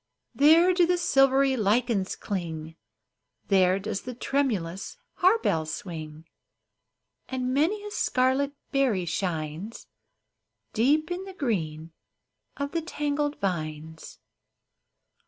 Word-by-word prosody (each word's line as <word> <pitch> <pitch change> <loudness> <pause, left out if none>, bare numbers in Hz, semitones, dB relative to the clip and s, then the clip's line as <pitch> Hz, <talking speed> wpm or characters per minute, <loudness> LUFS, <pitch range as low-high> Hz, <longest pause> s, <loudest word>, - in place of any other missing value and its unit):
There 325 +6 +6
do 350 -1 +4
the 360 0 +2
silvery 270 -5 +3
lichens 220 -2 +1
cling, 165 -5 -5 0.7
There 185 -1 +4
does 200 0 -4
the 250 -1 -7
tremulous 215 - -2 0.2
harebell 365 - +3
swing; 155 -2 -7 1.0
And 255 -1 -2
many 365 +10 +1
a 415 - -6
scarlet 260 -3 +1 0.2
berry 250 -10 +1
shines 170 +3 -4 0.9
Deep 295 +9 +2
in 365 +2 -3
the 385 -1 -10
green 165 - -2 0.7
of 280 0 -3
the 335 - -1
tangled 295 -2 -2
vines. 160 -4 -4
240 Hz, 100 wpm, -27 LUFS, 170-285 Hz, 1.0 s, There